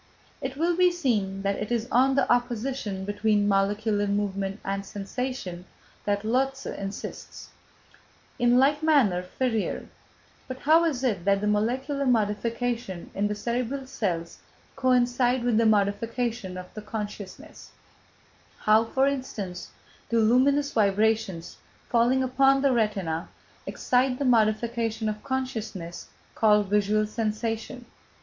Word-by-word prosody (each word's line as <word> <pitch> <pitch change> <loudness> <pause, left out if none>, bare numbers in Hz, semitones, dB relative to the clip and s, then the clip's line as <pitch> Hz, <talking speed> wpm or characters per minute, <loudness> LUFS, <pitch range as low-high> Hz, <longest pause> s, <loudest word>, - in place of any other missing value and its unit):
It 265 -1 -4
will 340 +3 +1
be 360 0 +4
seen 210 - -1
that 200 0 0
it 210 - -5
is 235 -1 0
on 265 +2 +4
the 275 - +2
opposition 240 -4 -2
between 205 0 +1
molecular 205 +1 +1
movement 200 0 -2
and 195 0 -2
sensation, 200 -2 -5 0.4
that 205 0 0
Lotze 270 +4 0
insists. 195 0 -7 0.9
In 245 0 +4
like 285 +3 +3
manner 270 - +3
Ferrier: 225 +4 -2 0.6
"But 260 - -6
how 320 +3 +5
is 275 -6 -1
it 205 -9 0
that 200 0 +3
the 210 - -2
molecular 260 +7 0
modifications 230 -2 -1
in 200 +1 +1
the 210 - -2
cerebral 250 +4 -2
cells 175 -10 -3 0.4
coincide 250 -1 +2
with 240 -3 +2
the 230 0 +4
modifications 220 0 0
of 180 0 -9
the 215 - -7
consciousness; 210 +5 -7 0.9
how, 215 +1 +4
for 265 +4 +1
instance, 225 -10 -4 0.4
do 230 - +2
luminous 275 +6 +3
vibrations 210 -4 +1 0.3
falling 245 +2 +3
upon 270 +1 +3
the 275 - +4
retina 200 -9 -1 0.4
excite 250 0 +1
the 280 - -2
modification 225 -1 +1
of 210 0 -5
consciousness 225 -10 -4 0.3
called 210 -2 +3
visual 210 +1 +2
sensation? 225 +3 -3
225 Hz, 125 wpm, -26 LUFS, 205-255 Hz, 0.9 s, how